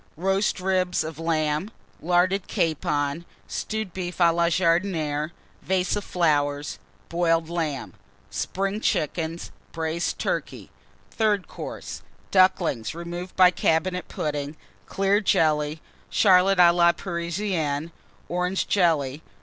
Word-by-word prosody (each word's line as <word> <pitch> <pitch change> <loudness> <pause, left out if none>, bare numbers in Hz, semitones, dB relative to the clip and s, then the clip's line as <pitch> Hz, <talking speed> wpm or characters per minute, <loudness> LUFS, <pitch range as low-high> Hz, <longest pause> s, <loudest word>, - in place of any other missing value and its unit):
_ - - -32
Roast 195 +4 +1
Ribs 185 -2 +1
of 160 -1 -7
Lamb. 155 +2 0 0.3
Larded 180 +3 +2
Capon. 150 -1 -1 0.2
Stewed 220 -4 -4
Beef 180 -1 -5
A 170 -1 +6
la 170 0 +2
Vase 170 - +1
of 170 0 +4
Boiled - - -11
Ham. 155 -5 -2 0.3
Jardinière. 165 -2 0
Flowers. 155 -6 -2 0.4
Spring 195 +3 -2
Chickens. 165 0 -1 0.2
Braised 165 +1 -2
Turkey. - - -3 0.4
Third 210 -4 +1
Course. - - -7 0.3
Ducklings, 185 - +2
removed 175 +2 -6
by 180 -1 +7
Cabinet 180 +2 0
Pudding. 145 0 -3 0.3
Clear 195 +2 +2
Jelly. 155 -5 +1 0.3
Charlotte 190 -1 +5
a 175 -1 +7
la 170 0 +4
Parisienne. 170 -4 -2 0.4
Orange 180 +2 -1
Jelly. 155 -7 +1
170 Hz, 110 wpm, -25 LUFS, 155-185 Hz, 0.4 s, by